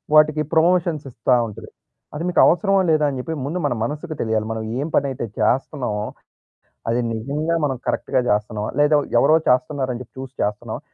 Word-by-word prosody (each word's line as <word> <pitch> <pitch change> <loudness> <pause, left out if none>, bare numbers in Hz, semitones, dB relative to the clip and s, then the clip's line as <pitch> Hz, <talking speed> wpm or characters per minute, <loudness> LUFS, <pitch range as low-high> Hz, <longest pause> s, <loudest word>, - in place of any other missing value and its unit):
వాటికి 155 0 +5
ప్రమోషన్స్ 165 -2 +2
ఇస్తా 115 +2 +1
ఉంటది. 105 - -10 0.5
అది 160 - -3
మీకు - - +1
అవసరమా 195 +3 +3
లేదా 155 -1 +3
అని 135 - -4
చెప్పి 160 - -4
ముందు 170 +5 -2
మన 140 - +1
మనకు 150 +6 -4
తెలియాలి. 110 -1 0
మనం 110 0 -4 0.2
ఎం 160 - -4
పనైతే 135 -4 0
చేస్తున్నామో. 125 -5 0 0.9
అది 120 - +1
నిజంగా 145 +9 -2
మనం 135 -2 -2
కరెక్ట్‌గా 130 - 0
చేస్తున్నామా? 105 0 -1
లేదా 150 +1 +5 0.2
ఎవరో 155 - +5
చేస్తున్నారని 125 0 +1
చెప్పి 125 - -19
చూసి 135 0 -8
చేస్తున్నామా? 110 +4 -3
135 Hz, 160 wpm, -21 LUFS, 115-155 Hz, 0.9 s, వాటికి